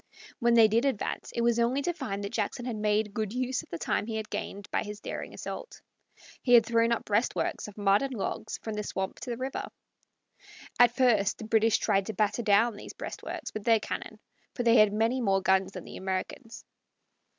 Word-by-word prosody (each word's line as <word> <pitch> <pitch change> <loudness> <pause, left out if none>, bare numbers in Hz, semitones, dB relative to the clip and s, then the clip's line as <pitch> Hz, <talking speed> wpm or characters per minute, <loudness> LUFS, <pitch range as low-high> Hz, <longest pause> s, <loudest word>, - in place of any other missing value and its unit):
When 235 -2 +3
they 225 -2 +8
did 225 +3 +2
advance, 265 -7 -2
it 235 - 0
was 235 0 +2
only 250 +4 +1
to 350 - 0
find 220 - -4
that 200 - -4
Jackson 230 +3 -2
had 245 -3 -3
made 210 0 0
good 215 -2 -2
use 255 0 -1
of - - -18
the 170 - -4
time 205 - -1
he 225 - -3
had 220 0 -4
gained 200 0 -5
by - - +1
his 210 -1 -7
daring - - -6
assault. - - -7 0.6
He 245 -2 +5
had 230 -2 +7
thrown 230 0 +2
up 235 - 0
breastworks 215 +1 0
of 210 - -12
mud 200 0 +3
and 275 -1 -2
logs 200 - -3
from 220 - -4
the 210 - -2
swamp 190 -2 -4
to 245 - -7
the 235 - -3
river. 260 +2 -4 1.1
At 245 0 +6
first 225 -7 +3
the - - -8
British 220 0 +3
tried 195 -3 +1
to 220 - -3
batter 210 +3 0
down 220 +1 +3
these - - -9
breastworks - - -6
with 215 - -5
their 225 0 +4
cannon, - - -5 0.4
for 245 - -1
they 235 0 +5
had 215 -1 +6
many 225 +5 +1
more 195 -4 +2
guns 190 0 +2
than 185 - -7
the - - -9
Americans. 190 +5 -5
220 Hz, 215 wpm, -29 LUFS, 205-235 Hz, 1.1 s, they